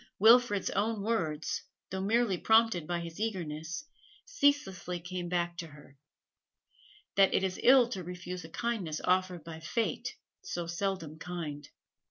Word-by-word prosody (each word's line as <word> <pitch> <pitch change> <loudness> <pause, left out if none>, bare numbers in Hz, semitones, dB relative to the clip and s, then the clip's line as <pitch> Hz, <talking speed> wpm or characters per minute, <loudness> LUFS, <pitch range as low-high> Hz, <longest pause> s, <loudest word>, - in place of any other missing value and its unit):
Wilfrid's 225 -1 +5
own 210 +1 0
words, 160 -9 -1 0.3
though 190 0 -2
merely 220 0 +2
prompted 220 -4 +3
by 175 -1 -1
his 170 +1 -8
eagerness, 170 - -3 0.4
ceaselessly 285 - +1
came 175 0 -5
back 175 -1 0
to 170 - -5
her 145 -2 -15 1.2
that 195 -1 +5
it - - +2
is 185 -1 -1
ill 255 -1 +7
to 190 -7 -4
refuse 180 0 -6
a 160 - -10
kindness 195 -8 -2
offered 185 -2 +1
by 165 -1 -8
fate, 220 +8 -2 0.3
so 175 -1 -4
seldom 170 -3 -3
kind. 155 -5 -5
180 Hz, 140 wpm, -31 LUFS, 170-220 Hz, 1.2 s, ill